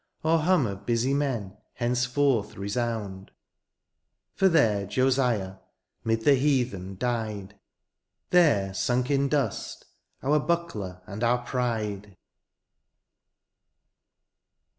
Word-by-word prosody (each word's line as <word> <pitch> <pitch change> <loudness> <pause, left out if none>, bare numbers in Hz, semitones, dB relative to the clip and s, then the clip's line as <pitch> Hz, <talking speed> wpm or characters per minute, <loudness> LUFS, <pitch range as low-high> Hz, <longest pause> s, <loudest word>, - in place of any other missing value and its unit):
Or 160 +1 +3
hum 170 -3 +3
of 100 -2 -5
busy 120 +3 +1
men^ 120 -9 -2 0.2
henceforth 125 -1 0
resound; 100 -2 -3 1.0
For 195 - +3
there 110 - +2
Josiah^ 120 -4 +1 0.4
*mid 115 0 0
the 145 - +4
heathen^ 125 -9 +1
died. 110 -4 -3 0.8
There 115 - +4
sunk 125 +7 0
in 140 0 +2
dust, 135 -7 -2 0.4
our 150 +3 +3
buckler 110 - -3
and 105 +2 -6
our 120 +1 +1
pride 105 -6 -3
120 Hz, 95 wpm, -27 LUFS, 100-135 Hz, 1.0 s, the